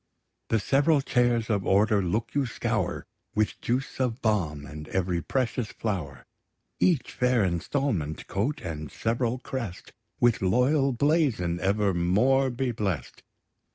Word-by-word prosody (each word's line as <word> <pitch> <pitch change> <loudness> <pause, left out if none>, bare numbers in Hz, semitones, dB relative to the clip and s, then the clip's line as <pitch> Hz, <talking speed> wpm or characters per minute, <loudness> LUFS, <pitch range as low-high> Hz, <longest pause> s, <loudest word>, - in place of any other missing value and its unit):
The 115 - +3
several 140 +6 +3
chairs 120 -4 +1
of 100 -3 +1
order 100 +2 +3
look 105 +5 -2
you 140 -2 +1
scour - - -2 0.3
With 105 0 0
juice 130 +3 -2
of 125 -2 0
balm, 85 -10 0
and 75 +1 -9
every 90 -2 -1
precious 125 - -1
flower: 75 - -4 0.5
Each 170 -8 +2
fair 125 -3 +2
instalment, 85 - -1
coat, 130 +10 -2
and 75 -4 -6
sev'ral 115 +2 -1
crest, 120 -7 -6 0.3
With 120 -2 +3
loyal 130 +8 +3
blazon 125 - +1
evermore 100 +7 +2
be 125 0 -1
bless'd! 100 - -3
110 Hz, 125 wpm, -27 LUFS, 90-130 Hz, 0.5 s, The